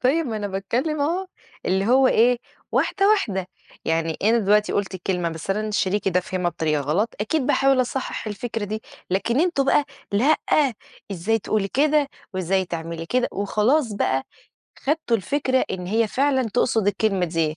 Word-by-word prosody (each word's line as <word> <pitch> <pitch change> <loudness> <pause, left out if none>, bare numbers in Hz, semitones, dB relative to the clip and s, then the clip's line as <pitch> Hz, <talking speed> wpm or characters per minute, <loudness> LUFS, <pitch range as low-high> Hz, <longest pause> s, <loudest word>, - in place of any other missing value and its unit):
طيب 285 +5 +2
ما 225 - -3
أنا 205 -1 -3
باتكلم 235 +11 -2
أهو، 345 +6 0 0.4
اللي 190 +1 +1
هو 260 +3 +5
إيه 240 +1 +4 0.3
واحدة 395 0 +2
واحدة، 210 - +1 0.4
يعني 160 0 0
أنا 225 +4 +4
دلوقتي 210 0 +3
قُلت 195 -2 -1
كلمة 180 -1 -1
بس 165 +3 -6
أنا 215 +2 -1
شريكي 205 -2 0
ده 180 0 +2
فهمها 180 -1 -2
بطريقة 155 -3 0
غلط، 160 - 0
أكيد 260 +5 0
باحاول 270 -2 +3
أصحح 255 -2 -3
الفكرة 220 +1 -4
دي، 215 +2 -4 0.3
لكن 230 +8 +1
أنتم 340 -6 +2
بقى 285 +1 +3 0.3
لأ 265 +10 +4 0.8
إزاي 200 +6 0
تقولي 205 -1 -1
كده؟ 295 +3 +2 0.3
وإزاي 185 +1 +1
تعملي 165 -1 -5
كده؟ 250 +4 +1
وخلاص 215 +6 +1
بقى 135 -9 0 0.6
خدتوا 295 -5 0
الفكرة 260 +5 0
إن 180 -1 -4
هي 220 +4 +2
فعلًا 270 +2 +2
تقصد 225 -4 +2
الكلمة 205 -2 +1
دي. 160 -2 -1
215 Hz, 160 wpm, -23 LUFS, 185-260 Hz, 0.8 s, هو